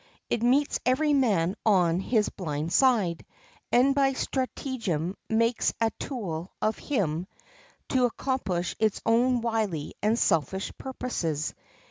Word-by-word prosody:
It 225 - +1
meets 265 +5 +2
every 290 +4 +2
man 200 -10 +2
on 180 -5 +3
his 210 +1 +1
blind 160 -3 -4
side, 220 -11 +3 0.5
and 255 +3 +5
by 270 -1 +3
stratagem 230 - -2
makes 230 +1 +1
a 225 -1 +2
tool 185 - -4
of 215 0 0
him 180 - -1 0.6
to 255 -1 +3
accomplish 210 -9 -2
its 220 -2 +1
own 240 +2 +3
wily 215 -10 -1
and 215 +3 +2
selfish 180 - +1
purposes. 175 - -3
220 Hz, 120 wpm, -27 LUFS, 175-255 Hz, 0.6 s, and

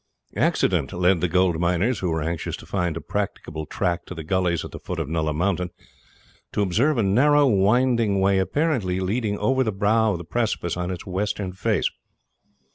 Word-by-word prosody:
Accident - - +1
led 90 -1 +2
the 90 - +2
gold 90 -1 +2
miners, 90 +8 +1
who 90 - -1
were 80 -2 -1
anxious 85 +1 -3
to - - -13
find 90 -4 -1
a - - -5
practicable 80 -6 -4
track 85 -1 -1
to 90 - -7
the 80 - -6
gullies 90 0 0
at - - -9
the - - -8
foot 90 - -5
of 80 -4 -2
Nulla 80 0 -1
Mountain, 90 +3 0 0.8
to 105 - +1
observe 120 - +2
a 115 - +2
narrow 145 +9 +4
winding 115 -1 +3
way 95 0 +3
apparently 110 - 0
leading 105 +2 -1
over 130 +6 +2
the 110 - -1
brow 105 +2 +2
of - - -2
the 85 - -7
precipice 105 -3 -1
on 90 0 -3
its 90 -2 -5
western 95 0 -2
face. 100 -1 0
95 Hz, 190 wpm, -24 LUFS, 85-110 Hz, 0.8 s, narrow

